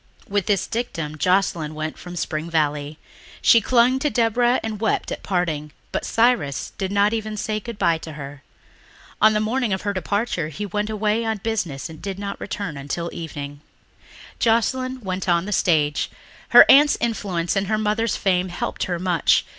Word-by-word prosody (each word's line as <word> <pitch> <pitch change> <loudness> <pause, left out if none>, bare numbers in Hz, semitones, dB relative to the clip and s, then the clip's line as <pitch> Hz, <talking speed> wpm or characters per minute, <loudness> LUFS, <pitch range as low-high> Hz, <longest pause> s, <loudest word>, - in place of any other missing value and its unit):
With 200 -2 -1
this 200 -3 +2
dictum 165 -10 -4
Joscelyn 180 -4 +1
went 155 0 -4
from 180 0 -9
Spring 155 -1 -3
Valley. 150 -2 -1 0.4
She 230 - +6
clung 250 +3 +3
to 295 +2 +1
Deborah 240 0 +2
and 220 -2 -4
wept 220 - 0
at - - -4
parting, 160 -6 -2 0.2
but - - -2
Cyrus 225 - +1
did 190 0 -2
not 205 +1 +3
even 215 -1 -3
say 215 +1 -2
goodbye 205 -7 0
to 160 -1 -8
her. 140 -1 -8 0.8
On 215 0 +6
the 210 - +2
morning 230 +2 0
of 190 - -3
her 205 0 -1
departure 200 -3 -1
he 160 +7 -5
went 210 +2 -2
away 215 +1 0
on 220 -1 -1
business 195 -10 -3
and 160 -1 -11
did 195 -1 -5
not 200 0 -5
return 195 -7 -4
until 155 +5 -4
evening. 145 -3 -7 0.8
Joscelyn 255 +3 +1
went 185 -2 -3
on 170 0 +2
the 210 - -2
stage. 150 -5 +2 0.4
Her - - +10
aunt's 290 +2 +7
influence 195 -7 -1
and 195 0 0
her 215 +1 +1
mother's 215 +1 0
fame 185 -1 +1
helped 175 - -3
her 175 -1 -2
much. 175 -3 +2
195 Hz, 175 wpm, -22 LUFS, 165-220 Hz, 0.8 s, Her